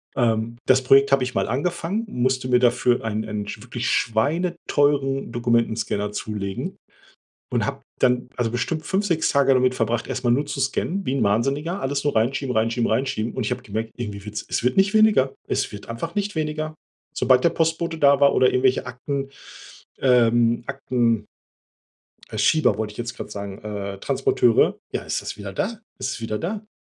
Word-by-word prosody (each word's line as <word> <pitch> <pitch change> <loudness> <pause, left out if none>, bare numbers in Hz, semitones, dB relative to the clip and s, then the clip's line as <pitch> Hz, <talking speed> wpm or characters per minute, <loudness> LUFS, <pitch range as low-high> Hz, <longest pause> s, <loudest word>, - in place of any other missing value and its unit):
Ähm, 115 -1 0
das 130 0 +4
Projekt 135 +2 +5
habe 135 -2 +4
ich 125 - -3
mal - - +1
angefangen, 175 - -2
musste 130 -2 0
mir 125 0 +5
dafür 125 0 +2
einen 110 -1 -2
einen 105 -1 -4
schw 105 - -7
wirklich 120 0 -3
schweineteuren 145 0 +1
Dokumentenscanner 115 -3 0
zulegen 105 -2 -4 0.8
und - - +1
habe - - -4 0.2
dann 125 0 +2
also 120 -2 0
bestimmt 155 +6 -2
5, 200 +2 0
6 165 -4 +1
Tage 140 -2 +4
damit 130 0 +3
verbracht, 115 0 -1
erst 130 -1 -4
mal 120 - +3
nur 140 +5 +2
zu 135 - -4
scannen, 180 +8 -1
wie 130 - 0
'n 140 - 0
Wahnsinniger, 135 - 0
alles 140 +1 -1
nur 145 - 0
reinschieben 125 +3 0
reinschieben 115 +1 +1
reinschieben. 120 -1 -1
Und 130 - -2
ich - - -1
habe - - -4
gemerkt, 110 +2 -4
irgendwie 105 -4 -6
wird's 105 0 -5
es - - -2
wird 125 - +1
nicht 195 +1 +4
weniger. 215 -12 +4 0.2
Es - - 0
wird 105 - -9
einfach 115 - -5
nicht 205 -1 -1
weniger, 155 0 -2 0.4
sobald 125 +2 +3
der 170 - +5
Postbote 165 0 0
da 140 -1 +5
war 140 - +5
oder 130 - +5
irgendwelche 130 +1 +2
Akten, 135 +2 -4 0.7
ähm, 120 -2 +3
Akten 120 -4 0 1.0
äh, - - -6
Schieber 155 0 +3
wollte 110 -1 -3
ich 105 - -16
jetzt 120 0 -4
grad - - -7
sagen 100 -1 -6
äh, 100 -2 -5
Transporteure. 115 +3 +2
Ja, - - -2
ist - - -3
das - - -6
wieder 100 -2 -7
da? 220 - -3 0.2
Es - - -2
ist - - -5
wieder 110 -1 -3
da? 210 +5 -4
125 Hz, 185 wpm, -23 LUFS, 115-140 Hz, 1.0 s, Projekt